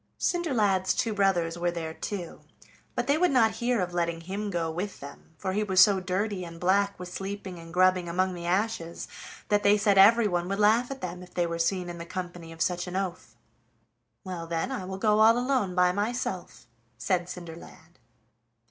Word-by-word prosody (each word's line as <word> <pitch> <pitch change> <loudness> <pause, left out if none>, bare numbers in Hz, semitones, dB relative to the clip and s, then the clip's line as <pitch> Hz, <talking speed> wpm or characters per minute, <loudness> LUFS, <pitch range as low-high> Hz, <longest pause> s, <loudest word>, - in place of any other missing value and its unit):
Cinderlad's 215 - +1
two 225 - 0
brothers 175 -4 +1
were 175 0 +1
there 165 -2 -4
too, 180 -1 -6 0.5
but 240 - -1
they 285 +4 +2
would 360 0 +4
not 235 -5 +4
hear 240 0 +1
of 180 -1 -2
letting 170 -1 -1
him 200 +5 -4
go 170 -3 -1
with 185 +5 -5
them, 140 +3 -12
for 190 +1 -3
he 210 - 0
was 190 -3 +1
so 195 0 +7
dirty 185 +1 -2
and 170 -1 -9
black 200 +2 +1
with 180 0 -8
sleeping 195 -2 -6
and 165 0 -11
grubbing 185 0 +3
among 185 +2 0
the 170 -1 -6
ashes 180 -3 -1 0.4
that 205 0 +3
they 205 +1 +5
said 200 -2 +3
everyone 200 -4 +5
would 195 - -1
laugh 220 +4 +3
at 270 -1 -7
them 180 0 -5
if 180 0 -14
they 175 - +2
were 170 0 -3
seen 180 +2 0
in 175 -1 -7
the 170 - -6
company 175 -2 -6
of 165 0 -1
such 175 0 -2
an 180 - -6
oaf. 185 -2 -4 0.9
"Well, 180 -3 -6
then, 165 +9 -2
I 245 -8 -4
will 190 +1 -5
go 210 +1 +2
all 225 +2 +6
alone 245 -7 0
by 180 0 +4
myself," 205 - -3 0.3
said 180 +4 0
Cinderlad. 170 -2 -11
185 Hz, 195 wpm, -27 LUFS, 175-205 Hz, 0.9 s, so